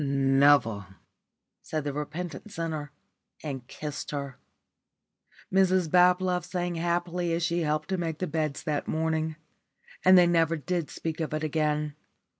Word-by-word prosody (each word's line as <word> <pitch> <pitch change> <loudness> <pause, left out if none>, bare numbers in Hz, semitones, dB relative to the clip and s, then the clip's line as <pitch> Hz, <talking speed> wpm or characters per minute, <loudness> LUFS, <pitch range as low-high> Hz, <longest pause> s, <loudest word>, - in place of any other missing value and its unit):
"Never," 135 -6 +3 0.7
said 155 -2 -3
the 145 -1 -3
repentant 165 +7 -5
sinner, 160 -4 -4 0.5
and 135 -5 -5
kissed 150 -1 -6
her. 140 -3 -5 1.1
Mrs 185 -3 +3
Bablove 180 0 +4
sang 175 0 -2
happily 175 0 -1
as 165 +1 0
she 170 0 +1
helped 155 0 -1
to 190 -1 -1
make 165 -3 -2
the 185 - -2
beds 155 -3 -2
that 150 -2 -2
morning. 160 0 -1 0.7
And 185 0 +8
they 180 - +7
never 165 -1 +2
did 170 +1 -2
speak 160 0 -5
of 155 -1 -2
it 155 - -3
again. 150 -1 0
160 Hz, 140 wpm, -28 LUFS, 150-175 Hz, 1.1 s, And